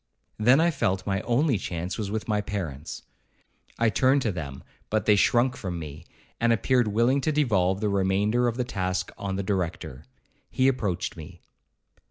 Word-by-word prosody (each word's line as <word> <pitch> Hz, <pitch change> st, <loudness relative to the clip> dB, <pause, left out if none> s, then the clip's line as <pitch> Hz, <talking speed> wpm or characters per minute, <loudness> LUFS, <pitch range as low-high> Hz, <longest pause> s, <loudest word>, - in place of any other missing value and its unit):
Then 125 Hz, +6 st, +5 dB
I 170 Hz, +1 st, +3 dB
felt 95 Hz, -, -1 dB
my 95 Hz, -1 st, -1 dB
only 125 Hz, -1 st, +1 dB
chance 90 Hz, 0 st, -4 dB
was 105 Hz, -3 st, -2 dB
with 110 Hz, +1 st, -3 dB
my 105 Hz, -2 st, +1 dB
parents. 85 Hz, -8 st, -5 dB, 0.7 s
I 115 Hz, -1 st, +3 dB
turned 130 Hz, +6 st, +3 dB
to 110 Hz, -, +1 dB
them, 70 Hz, -7 st, -6 dB, 0.3 s
but 110 Hz, 0 st, 0 dB
they 105 Hz, -, +5 dB
shrunk 120 Hz, +5 st, +3 dB
from 90 Hz, -6 st, -5 dB
me, 80 Hz, 0 st, -8 dB, 0.3 s
and 120 Hz, 0 st, +3 dB
appeared 120 Hz, +1 st, +2 dB
willing 120 Hz, +6 st, +2 dB
to 155 Hz, -, 0 dB
devolve 100 Hz, -10 st, +1 dB
the 105 Hz, -, +1 dB
remainder 100 Hz, +5 st, +1 dB
of 120 Hz, 0 st, -2 dB
the 125 Hz, -, +1 dB
task 95 Hz, -5 st, -2 dB
on 95 Hz, -1 st, -4 dB
the 100 Hz, -, -2 dB
Director. 85 Hz, -8 st, -3 dB, 0.4 s
He 130 Hz, -, +2 dB
approached 105 Hz, -9 st, -1 dB
me. 85 Hz, +1 st, -11 dB
100 Hz, 175 wpm, -26 LUFS, 90-120 Hz, 0.7 s, Then